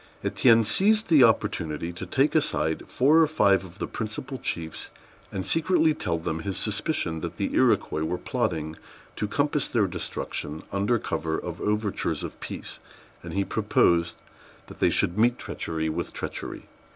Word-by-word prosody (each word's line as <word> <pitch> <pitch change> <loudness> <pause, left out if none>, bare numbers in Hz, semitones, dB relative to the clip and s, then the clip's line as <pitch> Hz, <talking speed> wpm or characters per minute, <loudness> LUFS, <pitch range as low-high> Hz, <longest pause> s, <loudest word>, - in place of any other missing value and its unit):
Étienne 115 -3 +4
seized 210 - +3
the 150 -6 +7
opportunity 85 -8 +1
to 85 - -7
take 135 +3 +2
aside 80 - +1
four 145 +6 +4
or 160 - +5
five 100 -11 +3
of 95 0 -12
the - - -2
principal 115 +5 -5
chiefs, 80 -2 -4 0.4
and 95 -1 -4
secretly 165 -1 +3
tell 85 - -2
them 80 0 -3
his 95 +3 -4
suspicions 105 - -1
that - - -5
the - - -2
Iroquois 80 - +2
were 90 +3 -1
plotting 80 -2 -2 0.4
to 105 - -2
compass 145 +5 0
their 110 -4 +2
destruction 80 -4 -4
under 100 +4 +1
cover 80 -6 -2
of - - -6
overtures 105 -1 -1
of - - -7
peace; - - -7 0.4
and - - -8
he 100 0 +1
proposed 85 -3 +2 0.5
that - - -13
they - - +4
should 90 +5 +1
meet 120 +2 +4
treachery 80 -1 -3
with 80 - -3
treachery. - - -5
100 Hz, 160 wpm, -26 LUFS, 85-130 Hz, 0.5 s, the